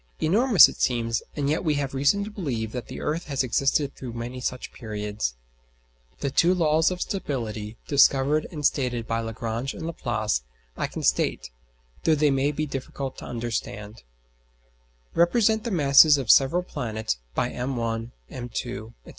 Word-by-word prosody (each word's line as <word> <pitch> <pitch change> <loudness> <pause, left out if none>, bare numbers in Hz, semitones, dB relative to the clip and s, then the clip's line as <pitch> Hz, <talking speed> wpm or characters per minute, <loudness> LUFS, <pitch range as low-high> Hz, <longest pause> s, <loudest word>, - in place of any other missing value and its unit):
Enormous 215 +5 +6
it - - -8
seems; 115 -2 +1
and 145 -2 -1
yet 150 +2 0
we 155 -4 +1
have 140 -2 -2
reason 145 +9 +2
to 210 - -7
believe 125 - -3
that 125 0 -6
the - - -7
earth 160 +3 -2
has 135 -2 -1
existed 135 +3 +1
through 125 -3 -8
many 120 +2 -5
such 125 0 -4
periods. 105 - -4 0.9
The 140 - -1
two 175 +6 +4
laws 160 -2 +3
of 180 -1 -5
stability 115 - -4
discovered 140 +1 +3
and 150 -4 -4
stated 125 -5 0
by 115 0 -1
Lagrange 115 +3 -4
and 160 - -6
Laplace 110 - -1 0.3
I - - -2
can - - -7
state, - - +1 0.5
though 160 - +4
they 150 -1 +3
may 135 +2 +1
be 155 +1 -2
difficult 135 -1 -5
to - - -9
understand: 115 -2 -5 1.1
Represent 220 +5 +3
the - - -1
masses 150 -4 +6
of 135 - -3
the - - +6
several 155 +7 +4
planets 110 - -3 0.2
by - - 0
m_1, 115 -3 -3 0.2
m_2, 120 -2 -5
&c. - - -13
135 Hz, 165 wpm, -25 LUFS, 115-155 Hz, 1.1 s, Enormous